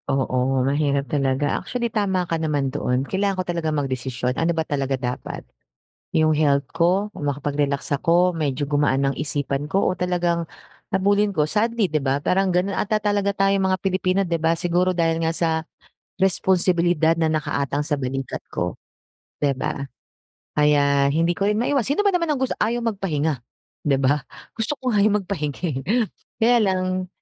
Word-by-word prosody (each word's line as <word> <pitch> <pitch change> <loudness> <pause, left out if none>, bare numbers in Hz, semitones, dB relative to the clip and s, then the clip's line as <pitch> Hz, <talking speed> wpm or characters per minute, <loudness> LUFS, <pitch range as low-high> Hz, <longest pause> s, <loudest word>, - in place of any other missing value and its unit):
Oo, 130 -1 +1
mahirap 140 0 +1
talaga. 135 0 +1
Actually, 235 -2 -3
tama 190 -4 +1
ka 165 -1 -2
naman 145 -4 0
doon 130 -2 0
kailangan 195 +3 -1
ko 185 - -1
talaga 170 -3 -2
magdesisyon, 130 -4 -2
ano 165 +5 0
ba 160 - 0
talaga 135 -2 -1
dapat. 125 -1 -5 0.7
'Yong 155 -1 +3
health 140 -2 +2
ko 180 +5 +2
o - - -7
makapag-relax 145 0 -1
ako, 175 +4 +2
medyo 145 -2 -1
gumaan 145 -2 +2
ang 135 - -2
isipan 145 -1 -2
ko 190 +6 +1
o 185 - -1
talagang 175 -2 0 0.5
habulin 200 +2 +2
ko. 155 -5 +1
Sadly, 220 +1 +1
'di 155 -2 0
ba, 135 +1 +1
parang 185 +4 +1
gano'n 185 +2 0
ata 215 +1 0
talaga 205 -1 +1
tayong 195 -1 +2
mga 185 - +1
Pilipino, 190 0 +1
'di 170 -2 0
ba, 165 0 +1
siguro 175 +2 +1
dahil 165 -2 +1
nga 160 - +1
sa, 165 0 0 0.7
responsibilidad 175 -3 +2
na 165 - +2
nakaaatang 145 -2 -1
sa 145 - 0
balikat 135 -1 -4
ko, 90 0 -3 0.6
'di 145 -1 +2
ba. 140 +1 -3 0.7
Kaya 140 -2 +4
hindi 165 +3 +2
ko 195 - -1
rin 210 - +1
maiwas 265 0 +1
sino 285 +7 +1
ba 400 - +4
naman 340 -2 +1
ang - - 0
gus 265 - 0
ayaw 235 +3 +1
magpahinga, 160 - -1 0.4
'di 140 -2 +3
ba, 140 +2 +2 0.4
gusto 225 +4 0
ko 255 - -2
nga 210 - +3
'yong 210 -1 +3
magpahinga, 150 -7 -3
eh. 145 - -3 0.6
Kaya 240 +2 +5
lang 185 -1 -1
165 Hz, 170 wpm, -23 LUFS, 140-190 Hz, 0.7 s, Kaya